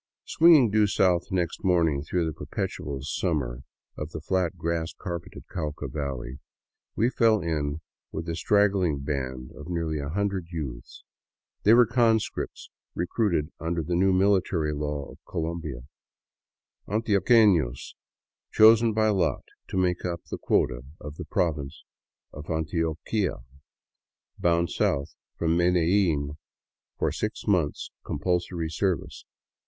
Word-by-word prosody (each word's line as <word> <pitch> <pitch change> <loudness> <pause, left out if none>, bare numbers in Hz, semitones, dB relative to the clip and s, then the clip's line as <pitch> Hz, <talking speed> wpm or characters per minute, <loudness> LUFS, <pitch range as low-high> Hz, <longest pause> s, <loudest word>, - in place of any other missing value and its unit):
Swinging 155 -9 +6
due 105 0 +4
south 90 -3 +2
next 90 +1 -1
morning 85 -6 +2
through 85 +3 -1
the 80 - -2
perpetual 70 -1 -4
summer 70 -5 -2 0.3
of 75 - -5
the 80 - -6
flat, 90 +3 -1
grass 85 0 -2
carpeted 85 -2 -6
Cauca 75 -3 -4
valley, 65 -2 -5 0.6
we 115 - +3
fell 115 -4 +3
in 75 -3 -2 0.3
with 80 +2 -5
a 85 - -2
straggling 95 -5 +2
band 65 -3 -4
of 75 +3 -10
nearly 80 -3 -2
a 70 0 -4
hundred 95 0 -1
youths. 70 -8 -7 0.6
They 110 +3 +6
were 120 0 +7
conscripts 115 -1 0 0.2
recruited 85 -4 0
under 85 0 -2
the 85 - -3
new 95 +2 +3
military 95 -5 +2
law 75 -1 -3
of - - -15
Colombia, 80 -6 -4 1.1
antioqueilos 100 - +3 0.6
chosen 110 +1 +6
by 110 0 +3
lot 95 -4 +1 0.2
to - - -4
make 90 -1 +1
up 85 -2 -3
the - - -4
quota - - +1 0.2
of 75 +1 -9
the - - -6
Province 75 -5 -2 0.5
of 75 +2 -9
Antioquia, 80 - -1 1.0
bound 85 -2 +2
south 70 0 0 0.2
from 80 0 +1
Medellin 85 -4 +2 0.6
for - - 0
six - - -4
months 85 -8 0
compulsory 90 -2 -2
service. 95 +1 -2
85 Hz, 125 wpm, -26 LUFS, 75-95 Hz, 1.1 s, were